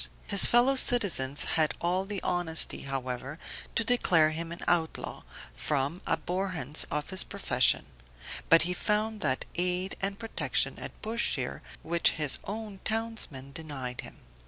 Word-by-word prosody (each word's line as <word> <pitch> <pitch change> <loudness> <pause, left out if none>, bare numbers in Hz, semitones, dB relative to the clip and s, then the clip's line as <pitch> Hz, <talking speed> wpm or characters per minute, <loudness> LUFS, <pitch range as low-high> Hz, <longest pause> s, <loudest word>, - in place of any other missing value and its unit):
His 200 -2 +7
fellow 245 +3 +4
citizens 195 - +3
had 155 -2 +1
all 180 +2 0
the 200 -1 -5
honesty, 175 -2 +2
however, 135 +1 -4 0.4
to 230 - +2
declare 175 -10 +3
him 165 +1 -4
an 170 - -7
outlaw, 165 -2 -1 0.3
from 140 - -2
abhorrence 175 -6 -1
of 150 +4 -3
his 190 - +3
profession; 130 -11 +2 0.6
but 165 0 +7
he 180 +2 -1
found 210 +3 -1
that 130 -3 0
aid 180 +2 -1
and 195 0 -1
protection 225 0 -1
at - - -8
Bushire, 225 +2 -2 0.2
which 170 +1 +2
his 150 -4 -1
own 210 -1 -6
townsmen 220 -12 -3
denied 135 -5 -6
him. - - -12
175 Hz, 135 wpm, -29 LUFS, 150-205 Hz, 0.6 s, His